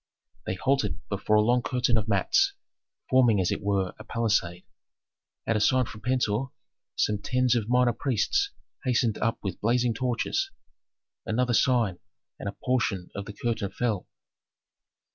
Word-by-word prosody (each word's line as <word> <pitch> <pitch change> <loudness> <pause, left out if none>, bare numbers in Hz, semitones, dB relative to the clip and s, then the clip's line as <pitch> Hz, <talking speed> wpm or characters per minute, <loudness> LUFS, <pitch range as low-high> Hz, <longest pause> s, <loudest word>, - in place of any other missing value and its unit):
They - - -1
halted 135 +6 0
before 105 +1 +1
a 105 - +6
long 120 +3 +3
curtain 125 -1 +1
of 110 -1 0
mats, 390 - +2 0.6
forming 120 -5 +5
as 90 - +1
it - - -2
were 100 -2 0
a - - -8
palisade. 100 -6 0 0.8
At 115 - +1
a - - +2
sign 130 +4 +3
from 105 -2 -10
Pentuer 125 0 0 0.5
some 105 -1 +1
tens 125 +4 +1
of 115 -2 -1
minor 125 -1 +4
priests 140 - 0 0.3
hastened 120 -4 +1
up 115 +1 0
with 95 - -4
blazing 120 +2 +2
torches. 125 - -1 0.7
Another 120 +2 0
sign, 115 -7 +2 0.4
and - - -3
a 100 - -10
portion 110 -8 0
of 100 - -5
the 105 - -8
curtain 110 -2 -2
fell. 110 -6 -2
115 Hz, 150 wpm, -27 LUFS, 105-125 Hz, 0.8 s, a